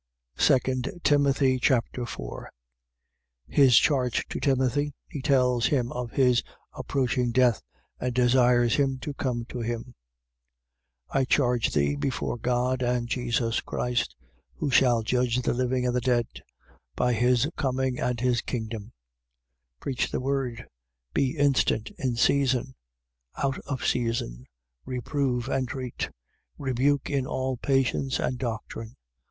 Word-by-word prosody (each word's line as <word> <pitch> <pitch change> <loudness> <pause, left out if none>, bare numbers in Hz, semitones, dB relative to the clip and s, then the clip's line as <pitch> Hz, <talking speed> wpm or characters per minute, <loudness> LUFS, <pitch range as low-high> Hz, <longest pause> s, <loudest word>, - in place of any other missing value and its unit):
2 - - +6 0.5
Timothy 140 -3 +3
Chapter 125 -1 +1
4 - - -7 1.0
His 130 -5 +5
charge 130 -5 +2
to - - -4
Timothy. 135 +1 +1
He 145 - -6
tells 125 -4 +3
him 125 -4 0
of 125 -1 -4
his 125 -1 +3 0.3
approaching 125 -2 -1
death 125 -1 +3 0.4
and 125 - -1
desires 125 -1 +3
him 135 -2 +1
to 145 - -4
come 125 -4 -2
to 125 - -5
him. 120 +1 -4 1.2
4:1. - - +3
I 135 - +2
charge 125 -4 +2
thee, 70 0 +2
before 120 - -2
God 125 +2 0
and 120 -1 0
Jesus 120 -1 0
Christ, 120 -1 -2 0.4
who 145 - -2
shall 120 -3 +4
judge 125 +1 +1
the - - +1
living 125 0 0
and 125 0 0
the 125 - +1
dead, 120 -1 +2 0.7
by 125 0 +2
his 125 +3 +3
coming 130 -2 -1
and 125 -1 -1
his 125 -1 +1
kingdom: 110 -2 -5 0.8
4:2. - - -51
Preach 130 -3 -2
the - - -1
word: 130 -3 -2 0.5
be 140 +3 0
instant 135 -6 +2
in 130 -3 -1
season, 130 +1 +2 0.6
out 135 -1 -1
of 135 -2 -3
season: 115 - -1 0.4
reprove, 125 0 -2
entreat, 130 -2 -3 0.5
rebuke 135 +2 0
in 135 -2 0
all 130 0 -2
patience 135 +1 +1
and 125 -1 -1
doctrine. 115 -1 -5
125 Hz, 130 wpm, -27 LUFS, 120-135 Hz, 1.2 s, 2